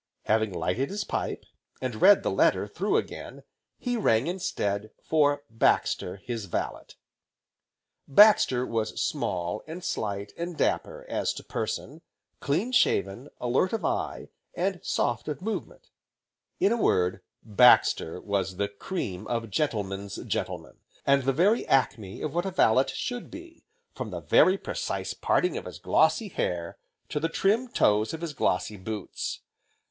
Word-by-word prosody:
Having 110 -2 +1
lighted 115 +10 -1
his 200 +1 -3
pipe, - - -3 0.3
and 125 -4 -4
read 200 +1 +7
the - - 0
letter - - +2
through - - 0
again, - - -5 0.3
he 245 -1 -2
rang 115 - +3
instead 110 - -2
for 145 -2 +2
Baxter, 110 -5 +1
his 115 +2 -5
valet. 90 - -4 1.2
Baxter 135 - +6
was 110 -2 -2
small, 90 +3 -2
and 170 +3 -7
slight, 100 - -3
and 170 -1 -5
dapper - - -1
as - - -1
to - - -9
person, - - -4 0.4
clean 180 - 0
shaven, 100 - +1
alert 125 - +1
of 225 - -1
eye, - - -2 0.3
and 185 0 -1
soft 120 +2 -1
of 150 -2 -3
movement, 220 +3 -5 0.7
in 200 - +3
a 235 -1 +1
word, 90 +1 +2 0.2
Baxter 110 -6 +4
was 95 -2 -2
the 100 0 0
cream 100 - -5
of 115 -2 -3
gentlemen's 100 -6 -2
gentlemen, - - -4 0.3
and 140 -1 +3
the 135 - +3
very 190 - +3
acme 110 -7 0
of 150 - -3
what 175 +3 0
a - - 0
valet 130 -8 +4
should 245 -1 -4
be, 335 0 -12 0.3
from - - -5
the - - -6
very 185 +1 +5
precise - - -3
parting 360 - +1
of - - -6
his - - -8
glossy 220 -4 +2
hair, 85 - -3 0.3
to 150 - -1
the 165 +2 -1
trim 210 +9 +1
toes 110 - +2
of 160 - -10
his 165 -3 -4
glossy 105 -4 0
boots. 105 +1 -5
130 Hz, 145 wpm, -27 LUFS, -, 1.2 s, read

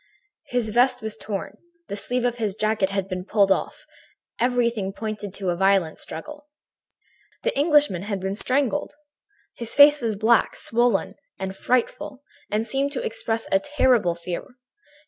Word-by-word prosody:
"His 245 -4 -1
vest 245 0 +3
was 220 -1 -2
torn, 200 -3 -6 0.3
the 200 - -4
sleeve 245 +4 -2
of 240 -1 0
his 215 -4 -1
jacket 215 -3 +1
had 195 -1 -2
been 185 -1 -4
pulled 200 0 +2
off, - - -1 0.5
everything 235 -5 +1
pointed 215 -2 -5
to, 190 -3 -1
a - - -1
violent 190 -3 +2
struggle. 295 - -8 1.0
"The - - 0
Englishman 290 - +3
had 200 0 -3
been 190 +1 -3
strangled! 285 +5 -1 0.6
His 235 -1 -4
face 290 0 +8
was 225 -3 -1
black, 225 +3 +3
swollen 225 -4 +1 0.2
and 190 0 -4
frightful, 265 +5 -1 0.3
and 215 +2 0
seemed 270 +5 0
to 265 - -3
express 225 0 -2
a 195 - +4
terrible 245 -8 +2
fear. 175 +7 -6
220 Hz, 150 wpm, -24 LUFS, 195-250 Hz, 1.0 s, face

